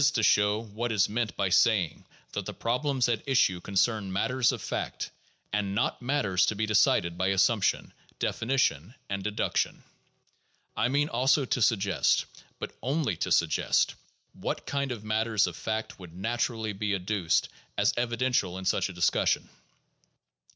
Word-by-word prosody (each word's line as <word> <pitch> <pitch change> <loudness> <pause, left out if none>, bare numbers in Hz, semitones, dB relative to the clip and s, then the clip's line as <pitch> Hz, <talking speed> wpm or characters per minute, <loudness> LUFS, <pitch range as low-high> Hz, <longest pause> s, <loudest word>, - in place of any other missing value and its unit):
to 115 - 0
show 105 0 +4
what 115 +2 -4
is 105 -3 +3
meant 115 0 -2
by 100 - +1
saying 95 -2 +2 0.3
that - - -4
the - - -4
problems 125 +2 0
at 115 -2 0
issue 95 -9 +3
con 100 - -8
cern 100 +1 +2
matters 125 +6 +1
of - - -4
fact, - - -4 0.4
and 100 -1 -1
not - - 0
matters 105 -9 +1
to 110 - 0
be 110 +2 0
decided 100 -5 +2
by 95 - +1
assumption, 95 +2 +2 0.2
definition, 115 - 0 0.2
and 100 0 -2
deduction. 105 +1 -1 0.9
I 115 - +2
mean 145 +3 +1
also 135 +2 +2
to 125 - -1
suggest, 105 -5 +2 0.3
but - - -6
only 135 - 0
to - - -2
sug - - +4
gest, - - +1 0.4
what - - -4
kind 140 -1 -2
of 115 -4 -5
matters 110 0 +1
of 90 -3 -5
fact 110 +5 -4
would 90 -2 -11
naturally 110 +1 -2
be 105 +1 -1
adduced 90 -2 0 0.3
as - - +3
evidential 120 -6 0
in 95 - -7
such 95 - +1
a - - -7
discussion. 90 0 +1
110 Hz, 160 wpm, -28 LUFS, 95-120 Hz, 0.9 s, show